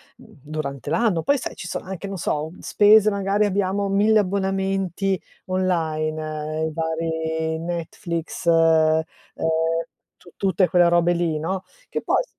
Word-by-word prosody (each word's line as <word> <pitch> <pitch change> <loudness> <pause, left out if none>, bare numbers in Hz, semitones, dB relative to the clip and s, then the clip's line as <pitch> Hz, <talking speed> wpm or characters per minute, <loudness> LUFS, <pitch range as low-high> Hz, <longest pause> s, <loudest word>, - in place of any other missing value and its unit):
durante 145 -1 -7
l'anno. 175 0 +2
Poi 285 - +2
sai 260 - -5
ci 180 - -7
sono - - -5
anche, 190 +1 -6
non 195 -1 -5
so, 155 -1 -2
spese 215 0 +5
magari 200 +1 +1
abbiamo 200 0 0
1000 210 +2 +4
abbonamenti 195 -1 -1 0.2
online, 155 -4 -1
i - - -4
vari 160 0 -2
Netflix 170 0 -4
uhm, 160 -1 +4 1.1
tu 175 - -17
tutte 190 -2 +2
quelle 175 -1 +4
robe 175 0 +3
lì, 170 -2 0
no, 185 +4 -3 0.3
che - - -3
poi - - +1
s - - -16
175 Hz, 135 wpm, -23 LUFS, 160-195 Hz, 1.1 s, spese